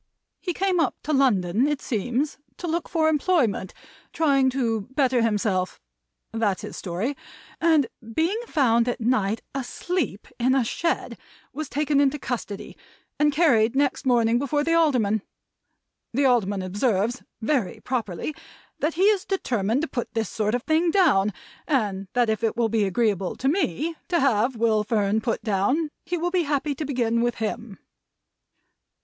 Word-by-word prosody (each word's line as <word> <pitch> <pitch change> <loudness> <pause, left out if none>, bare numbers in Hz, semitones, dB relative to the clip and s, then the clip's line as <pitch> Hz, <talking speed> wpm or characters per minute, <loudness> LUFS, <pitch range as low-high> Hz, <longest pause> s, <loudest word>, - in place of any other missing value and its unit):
He 360 - -3
came 370 +1 0
up 305 -6 +1
to 305 - -1
London, 235 -4 +3
it 295 -2 -1
seems, 250 +7 -2 0.2
to - - -6
look 340 0 -2
for 320 -2 +2
employment 295 - +1 0.4
(trying 275 -4 +3
to 230 -6 -1
better 260 -4 +3
himself 205 -4 0 0.5
that's 215 -4 -1
his - - -7
story), 195 +10 -3 0.5
and 320 -4 +4 0.3
being 350 +8 +1
found 235 -5 +3
at 245 - -1
night 225 -3 0
asleep 275 - -3
in 255 +2 +3
a 265 - +3
shed, 335 +8 -2 0.3
was 305 +1 -5
taken 290 0 +1
into 285 +1 +2
custody, 235 -6 -5 0.4
and 295 0 +4
carried 260 -7 +3
next 280 -1 +1
morning 235 -1 +3
before 285 +2 0
the 330 +2 +1
Alderman. 250 -11 +2 0.9
The 280 +1 +3
Alderman 205 -6 +2
observes 205 +4 0 0.2
(very 235 -4 -1
properly) 230 - -3 0.5
that 305 +2 0
he 365 - +1
is 410 -2 +4
determined 240 - -1
to - - 0
put 240 -5 -5
this 225 -3 -1
sort 215 +1 0
of 245 - -3
thing 320 +2 +2
down, 285 - +3 0.4
and 205 -9 0
that 245 -1 +3
if 220 +1 -1
it 225 - 0
will 230 -2 +2
be 220 -1 +2
agreeable 195 -2 0
to 265 - -2
me 315 - 0
to 345 -2 +1
have 250 -2 +2
Will 220 -2 +2
Fern 210 -1 +1
put 230 -1 -2
down, 235 - +1
he 355 - -2
will 350 +1 -1
be 365 -1 +2
happy 290 -1 -1
to 300 +3 -4
begin 235 -4 0
with 240 0 0
him." 225 -1 -4
250 Hz, 160 wpm, -24 LUFS, 220-300 Hz, 0.9 s, and